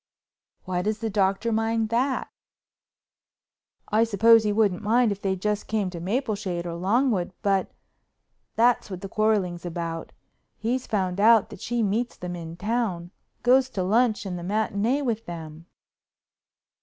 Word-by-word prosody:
"Why 180 -1 -1
does 210 +3 -1
the 225 0 -3
Doctor 195 +3 +1
mind 225 0 0
that?" 255 +4 0 1.6
"I 220 +1 +3
suppose 225 +1 +5
he 210 - +1
wouldn't 205 -4 +1
mind 225 +2 +3
if 200 0 -5
they 190 -1 0
just 210 +2 -2
came 210 -4 -1
to 175 - -6
Mapleshade 200 -3 -2
or 170 - -4
Longwood. 195 +1 +1
But—that's 210 +4 -2
what 185 -2 -6
the 195 - -5
quarreling's 205 -6 0
about—he's 175 +8 -5
found 190 -3 -1
out 220 0 +5
that - - -10
she 240 -1 -1
meets 225 +4 -1
them 180 0 -5
in 165 -1 -8
town, 205 -5 -2 0.3
goes 255 +1 +4
to 190 -7 -2
lunch 220 +3 +2
and 180 -2 -4
the - - -7
matinée 220 +7 0
with 225 -2 -2
them." 165 -1 -8
210 Hz, 145 wpm, -25 LUFS, 180-230 Hz, 1.6 s, suppose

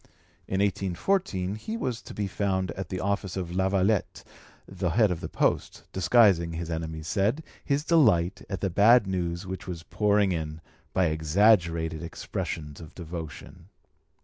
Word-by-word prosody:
In 95 +1 0
1814 95 - 0
he 220 - -5
was 125 - -3
to - - -11
be 105 - -1
found 95 -2 -1
at 95 0 -6
the 95 - -3
office 100 -1 -2
of 90 -2 -4
Lavallette, 95 +2 +1 0.4
the 95 -1 -2
head 105 +3 +3
of 85 - -3
the - - -5
posts, - - 0
disguising, 95 -3 +4
his 85 0 -4
enemies 80 -1 -4
said, 110 - 0 0.2
his 140 0 0
delight 105 - +3
at 95 -4 -4
the 95 - 0
bad 110 +5 +6
news 90 -1 -2
which 95 +1 -6
was 85 -3 -6
pouring 105 0 +2
in, 80 -2 -3 0.3
by 95 - +2
exaggerated 80 0 +2
expressions 75 -2 -5
of 80 - -12
devotion. 85 +1 -8
95 Hz, 150 wpm, -27 LUFS, 85-100 Hz, 0.4 s, bad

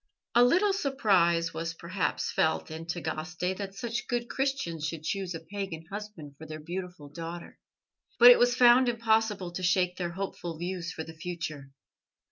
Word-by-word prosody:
A 240 - +6
little 370 +11 +4
surprise 195 - +2
was 165 +1 -4
perhaps 180 +3 -2
felt 160 0 0
in 160 +1 -7
Tagaste 170 +2 -3
that 195 -1 -6
such 235 +3 -4
good 240 -1 -2
Christians 265 - -1
should 160 -1 -5
choose 185 0 -2
a - - -4
pagan 190 -2 -6
husband 205 -8 -7
for 160 - -9
their 155 0 -7
beautiful 180 -1 -6
daughter, 165 +3 -8 0.6
but 245 +1 +10
it 245 - +6
was 245 0 +4
found 245 +1 +6
impossible 220 -5 +1
to 175 - -5
shake 180 0 +2
their 175 -2 -3
hopeful 175 -3 -5
views 175 0 -4
for 160 - -5
the 160 - -10
future. 160 -4 -6
180 Hz, 165 wpm, -29 LUFS, 165-220 Hz, 0.6 s, but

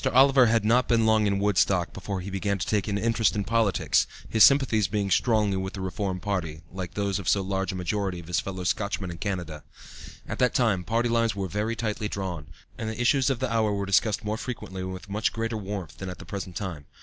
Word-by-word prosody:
Oliver 135 -1 +6
had 110 -1 +2
not 120 +3 +3
been 115 -2 +3
long 110 -1 +4
in 100 -1 +1
Woodstock 100 -3 +2
before 95 0 -4
he 100 +2 -6
began 100 +1 -1
to 90 - -3
take 105 -1 0
an 100 -1 0
interest 115 0 +2
in 105 - 0
politics, 115 -2 +2 0.2
his 110 -2 +5
sympathies 130 -7 +5
being 100 -1 -1
strongly 105 -2 +2
with 95 0 -4
the 95 - -6
Reform 95 0 -3
party, 85 -6 -3
like 90 0 -6
those 100 -1 0
of 95 - -2
so 100 - +3
large 95 0 -1
a - - -6
majority 95 0 -2
of 85 - -10
his 85 0 0
fellow 95 -1 -5
Scotchmen 100 -1 -1
in 85 - -8
Canada. 85 -7 -4 0.6
At - - -5
that 125 -2 +2
time 110 -7 +2
party 115 +5 0
lines 115 -2 +1
were 100 -1 -2
very 105 +5 -2
tightly 110 -1 -2
drawn, 90 -7 -4 0.3
and 110 - -3
the 110 +1 -6
issues 130 +2 +3
of 135 - 0
the 130 -1 -2
hour 110 -2 +2
were 100 0 -2
discussed 100 +2 +1
more 105 +1 -1
frequently 105 -6 -6
and 95 0 -4
with 95 +2 -8
much 105 +3 0
greater 115 0 -3
warmth 100 -6 -5
than 95 - -5
at 90 - -7
the - - -11
present 95 -3 -6
time. 85 -9 -5
100 Hz, 235 wpm, -26 LUFS, 95-110 Hz, 0.6 s, Oliver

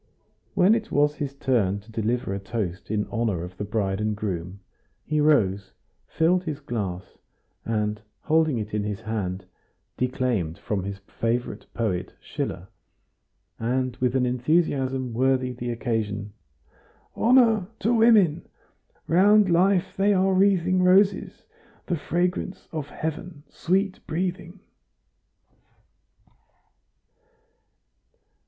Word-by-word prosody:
When 185 +3 +5
it 225 0 -2
was 145 +1 +3
his 145 -2 -5
turn 115 -9 +1
to 110 +3 -17
deliver 115 -1 -1
a 100 - -3
toast 95 -3 -4
in 105 0 0
honor 115 -7 -1
of 90 +1 -8
the - - -3
bride 100 -1 -1
and 105 0 0
groom, 95 -2 -4 0.5
he 155 -1 0
rose, 100 -10 +2 0.3
filled 175 +3 +2
his 155 -4 -4
glass, 100 -10 -5 0.5
and 105 -1 -1 0.2
holding 160 -4 +2
it 105 -1 -5
in 105 -1 0
his 105 +1 -4
hand, 100 -4 -3 0.5
declaimed 125 -10 -1
from 100 -3 -3
his 100 0 -5
favorite 115 +3 -3
poet 100 -6 -2
Schiller, - - -5 0.9
and 125 +2 -1
with 125 0 0
an 130 -1 +2
enthusiasm 130 -1 0
worthy 130 +1 +1
the 120 0 -5
occasion: 110 -4 -2 0.8
"Honor 225 -5 +4
to 230 - +1
women! 215 -8 +4 0.6
round 200 +3 +5
Life 185 +2 +2
they 200 +1 +3
are 190 +1 +3
wreathing 185 -1 +3
Roses, 190 +2 +3 0.4
the 175 - -1
fragrance 180 +4 -2
of 150 -3 -5
Heaven 160 0 -5
sweet 190 +2 0
breathing!" 180 +2 -3
130 Hz, 115 wpm, -25 LUFS, 105-180 Hz, 0.9 s, When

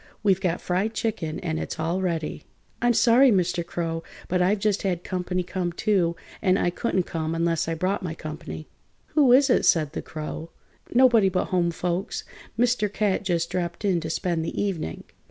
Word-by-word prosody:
We've 195 -2 +3
got 180 -3 0
fried 195 +5 -1
chicken 170 -9 -2
and 160 -3 -2
it's - - -5
all 170 +4 0
ready." 165 -4 -2 0.4
"I'm 240 0 +3
sorry, 250 +4 +6
Mr. 180 -3 +1
Crow, 165 -1 -3 0.3
but 180 0 +1
I've 190 +4 +3
just 205 0 0
had 180 -3 -1
comp'ny 180 0 -2
come, 180 -1 -2
too, 175 -2 +1 0.3
and 185 0 +3
I 175 - +1
couldn't 190 -1 0
come 160 -1 -3
unless 165 -1 0
I 165 - -1
brought 185 +5 -1
my 170 -4 -4
comp'ny." 155 0 -7 0.4
"Who 285 -5 +4
is 270 +2 +6
it?" - - +3
said 155 -4 +3
the - - -3
Crow. 160 +1 -6 0.4
"Nobody 240 -5 +5
but 180 0 -1
home 175 -2 +2
folks. 175 +4 -2 0.3
Mr. 235 -4 +2
Cat 205 -2 +1
just 170 -3 0
dropped 175 +2 -3
in 185 -4 +2
to 160 -1 -5
spend 165 0 -1
the - - -4
evening." 170 - -2
180 Hz, 185 wpm, -25 LUFS, 165-200 Hz, 0.4 s, sorry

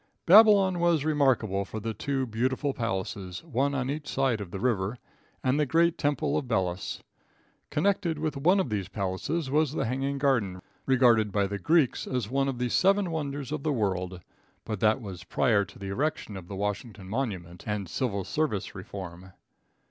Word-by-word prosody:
Babylon 195 -1 +7
was 170 -4 +2
remarkable 130 -10 +2
for 110 +2 -6
the 110 +1 -3
two 135 +2 -1
beautiful 130 +5 -1
palaces, 95 -5 -4
one 140 -2 0
on 130 -2 -1
each 145 +2 -4
side 130 -5 0
of 100 - -6
the 95 - -6
river, 110 -2 0 0.5
and 130 +3 +2
the 150 - +3
great 170 +4 +3
temple 145 -2 0
of 135 - -8
Belus. 95 -5 -2 0.7
Connected 170 0 +1
with 155 0 -2
one 175 +8 +3
of 150 - -1
these 100 -3 -1
palaces 105 - -2
was 150 -1 +2
the - - -1
hanging 135 +4 -1
garden, 120 -10 +1 0.3
regarded 120 -5 +4
by 100 0 +2
the 100 0 -4
Greeks 155 -2 +2
as 125 -4 -2
one 135 +1 +1
of 135 -2 -2
the 125 0 -1
seven 195 - +3
wonders 145 -3 -3
of 155 - -2
the 155 - 0
world, 95 -6 -1 0.4
but 110 -3 -3
that 110 +3 +3
was 95 -4 -7
prior 105 +3 +2
to 95 - -15
the 100 -1 -6
erection 120 -1 -2
of 95 -2 -8
the 100 - -6
Washington 105 0 -4
monument 95 -7 -4
and 105 -3 -2
civil 100 - -2
service 145 - -2
reform. 95 -1 -8
125 Hz, 180 wpm, -28 LUFS, 100-145 Hz, 0.7 s, Babylon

